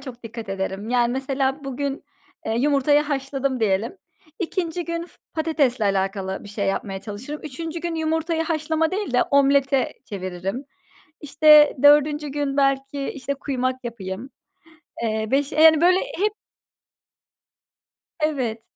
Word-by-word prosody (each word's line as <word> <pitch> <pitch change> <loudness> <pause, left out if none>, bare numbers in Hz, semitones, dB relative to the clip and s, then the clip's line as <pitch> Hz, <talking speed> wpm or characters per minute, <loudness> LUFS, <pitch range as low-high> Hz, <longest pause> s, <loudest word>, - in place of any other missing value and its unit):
çok 255 -3 -10
dikkat 225 -2 -8
ederim. 195 +2 -4
Yani 240 -1 +2
mesela 270 +1 -1
bugün, 275 +1 -4 0.4
eee, 220 +1 0
yumurtayı 290 +1 +3
haşladım 270 -3 -2
diyelim, 215 - 0 0.4
2. 350 -1 -2
gün 335 0 -3
f - - -17 0.2
patatesle 295 -8 +1
alakalı 195 -1 -1
bir 205 - -10
şey 200 -1 -3
yapmaya 195 0 -2
çalışırım, 220 +9 -7
3. 320 +3 -6
gün 340 -1 -3
yumurtayı 320 +1 0
haşlama 320 0 0
değil 395 -7 -3
de 250 - +4
omlete 275 -1 +3
çeviririm. 190 +5 -5 0.6
İşte 300 0 +6
4. 295 0 +5
gün 285 0 -2
belki 275 0 +1
işte 280 +1 -4
kuymak 260 -2 -3
yapayım. 230 +2 -6 0.7
Eee, 220 -1 -1
beşi 280 +3 +1
yani 315 0 +7
böyle 365 +2 +5
hep 415 +3 -1 1.9
Evet. 260 -8 -1
275 Hz, 130 wpm, -23 LUFS, 230-305 Hz, 1.9 s, yani